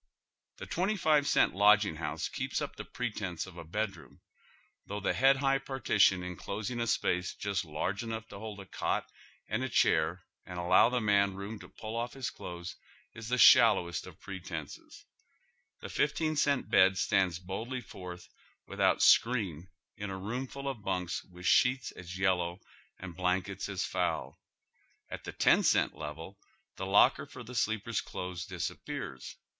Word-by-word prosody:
Tlie - - -7
twenty 195 +5 0
five 150 -4 +3
cent - - +3
lodging 100 -3 +4
house 80 - -3
keeps - - -3
up - - -5
tiie - - -9
pre 125 -2 -2
tence 90 -6 -4
of 95 -3 -12
a 85 - -8
bedroom, 100 +4 -5 0.7
though 100 +1 -4
the 100 - 0
head 135 +1 +5
high 135 0 +2
partition 110 -9 +2
en 90 0 -5
closing 110 +7 -4
a 115 - -1
space 90 -4 0
just 100 -2 -2
large 85 +5 -3
enough 115 -1 -5
to 100 - -9
hold 110 -1 -7
a 100 - -9
cot - - -2 0.4
and 110 +4 -1
a 130 - -2
chair 85 -4 +2 0.2
and 90 - -8
allow 90 +6 +5
the 125 0 0
man 100 -3 +2
room 100 +3 -6
to - - -12
pull 110 +1 -7
off 120 +2 -3
liis 135 -2 -4
clothes 85 0 -7 0.4
is 110 0 -8
the 125 - +1
shal - - +8
lowest 85 -1 -4
of - - -11
all - - -35
pretences. 85 -6 -8 0.8
The - - -6
iifteen 160 -1 0
eent 145 -3 +1
bed 95 0 +5
stands 95 -4 +2
boldly 110 +8 -5
forth 90 -5 -9 0.4
without - - +2
screen 95 -8 +3 0.3
in 105 -1 -5
a 95 - -4
room 120 +7 -4
full 140 +1 -7
of 130 -5 -4
bunks 90 -3 -2
with 90 -1 -12
sheets 125 +6 +3
as 90 +1 -9
yellow 90 -2 +1 0.4
and 90 -2 -8
blankets 95 +3 -1
as 95 -2 -2
foul. 80 -6 -2 0.7
At - - -7
the - - -5
ten - - +4
cent - - +2
level 80 +6 -8 0.4
the - - -4
locker - - +4
for 125 - -10
the 120 +2 -10
sleeper's 110 -2 0
clothes 90 -2 -6
disappears. 65 -1 -5
100 Hz, 170 wpm, -31 LUFS, 90-115 Hz, 0.8 s, shal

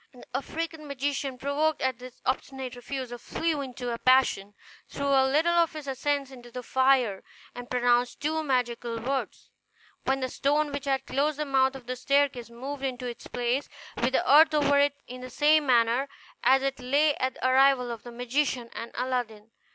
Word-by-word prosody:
The 250 - -14
African 315 +3 -4
magician, 280 -1 -2
provoked 290 +4 0
at 260 -2 -1
this 250 -1 -12
obstinate 260 -1 -3
refusal, 245 -1 -6
flew 320 +1 -2
into 250 -2 -5
a 230 - -5
passion, 250 -6 +3 0.3
threw 280 - -5
a 270 -1 +4
little 320 +5 +3
of 340 -1 +3
his 305 -2 -7
incense 275 +1 -1
into 245 -2 -12
the 250 +1 -7
fire, 260 -5 +2 0.3
and 245 0 -9
pronounced 245 0 +1
two 315 +2 -1
magical 240 -4 -1
words, 265 +4 -4 0.5
when 270 0 +1
the 260 - 0
stone 290 +3 +1
which 285 0 -5
had 270 -1 0
closed 285 +2 0
the 300 - -2
mouth 265 -1 +2
of 260 -2 -10
the 255 +1 -4
staircase 275 -2 +1
moved 265 +4 -7
into 255 -2 -3
its 240 -1 -7
place, 245 +3 -1 0.3
with 245 +2 0
the - - +1
earth 310 +2 +7
over 285 -1 +3
it 285 0 +3
in 250 0 -9
the 255 - -7
same 295 +3 +3
manner 240 +2 +3 0.3
as 265 +1 +4
it 270 0 -2
lay 285 +4 +2
at 260 0 -1
the - - -1
arrival 260 -1 +4
of 230 -2 -6
the 240 - -10
magician 245 0 -1
and 230 - -6
Aladdin. 230 -4 -3
265 Hz, 185 wpm, -27 LUFS, 245-285 Hz, 0.5 s, earth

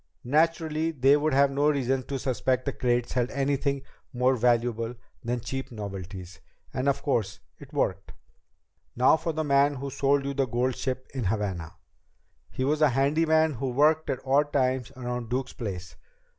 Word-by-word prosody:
Naturally, 160 +2 +1
they 140 -2 +4
would 150 -1 +1
have 140 0 +4
no 145 +2 +2
reason 135 -2 +1
to 140 - -2
suspect 130 0 0
that - - 0
the - - -17
crates 120 -1 +1
held 125 0 0
anything 140 0 -1 0.3
more 125 +1 +2
valuable 120 -1 +1 0.3
than 120 0 -2
cheap 130 +3 -5
novelties. 95 -5 -7 0.3
And, 135 +2 +1
of 140 0 -1
course, 115 -8 -1 0.2
it - - -13
worked. - - -1 0.8
"Now 125 +5 +5
for 165 +1 -2
the 155 0 -2
man 140 0 +3
who 140 +1 -5
sold 140 +1 +1
you 140 - -2
the 135 -1 0
gold 125 +2 0
ship 130 -1 -3
in 130 -5 -3
Havana. 95 -5 -2 0.7
He 130 - -3
was 150 +3 +1
a 150 - +6
handyman 155 +4 +2
who 130 +1 -3
worked 150 +5 +3
at 130 0 -3
odd 145 +2 +2
times 130 -2 0
around 125 -2 -4
Duke's 130 +1 -2
place. 90 -7 -6
130 Hz, 170 wpm, -27 LUFS, 120-140 Hz, 0.8 s, a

